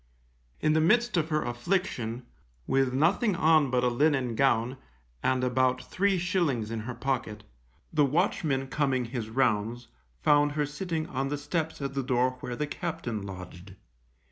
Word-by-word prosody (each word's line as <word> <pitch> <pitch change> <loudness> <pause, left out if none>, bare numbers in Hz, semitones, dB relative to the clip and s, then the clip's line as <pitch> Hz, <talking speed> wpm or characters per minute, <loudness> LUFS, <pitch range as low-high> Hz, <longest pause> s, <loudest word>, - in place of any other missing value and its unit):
In 155 0 +3
the 160 - +3
midst 235 +8 +3
of 165 -2 +1
her 155 -1 +1
affliction, 120 -3 -2 0.4
with 135 -1 +2
nothing 175 - +2
on 155 -3 +4
but 125 -1 +1
a - - +4
linen 130 -1 +2
gown, 125 +1 +2 0.4
and 130 -1 +1
about 130 0 +2
three 195 +5 +1
shillings 170 - 0
in 115 - -2
her 120 +3 -5
pocket, 115 -4 -3 0.5
the 150 -2 +4
watchman 145 -2 +1
coming 135 -2 0
his 115 -2 -5
rounds, 120 -1 0 0.3
found 145 0 +4
her 150 0 0
sitting 160 +2 -3
on 135 -1 -2
the 145 +1 -2
steps 160 0 -3
at 135 -1 -3
the 135 - -1
door 125 -1 +1
where 125 - -5
the 150 - -1
captain 150 -8 -4
lodged. 95 -1 -9
135 Hz, 160 wpm, -28 LUFS, 120-155 Hz, 0.5 s, on